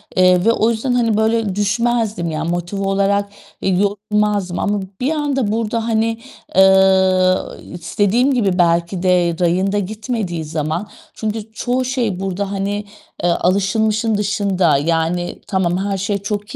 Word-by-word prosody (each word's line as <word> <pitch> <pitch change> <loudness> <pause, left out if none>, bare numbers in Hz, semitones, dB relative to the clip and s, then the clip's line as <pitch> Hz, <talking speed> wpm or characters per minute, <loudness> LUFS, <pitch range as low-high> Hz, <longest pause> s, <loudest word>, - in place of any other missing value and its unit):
eee, 185 +1 +4
ve 230 - +5
o 225 0 +2
yüzden, 240 +3 -1
hani, 230 -3 +2
böyle 220 -3 +1
düşmezdim, 215 -3 0
yani, 155 +2 -3
motive 175 +3 -3
olarak 200 +1 +1 0.3
e - - -2
yorulmazdım 205 0 0
ama 205 0 0 0.2
bir 270 - +1
anda 280 -8 -1
burada, 225 +1 -1
hani, 225 0 +1 0.4
eee, 190 -1 +5 0.4
istediğim 205 +10 +1
gibi 200 -7 +1
belki 170 +2 +1
de 180 -2 +2
rayında 185 +4 +1
gitmediği 205 -4 -3
zaman 155 +5 -3 0.3
çünkü 220 0 -4
çoğu 250 +3 -1
şey 240 -7 -1
burada, 195 +1 -3
hani, 200 +1 -2 0.4
eee, 175 - +3
alışılmışın 210 +5 +1
dışında. 195 -6 +1
Yani 165 +3 -1
tamam, 180 -3 0
her 195 +1 -2
şey 200 +2 -1
çok 205 +1 -5
200 Hz, 140 wpm, -18 LUFS, 180-220 Hz, 0.4 s, ve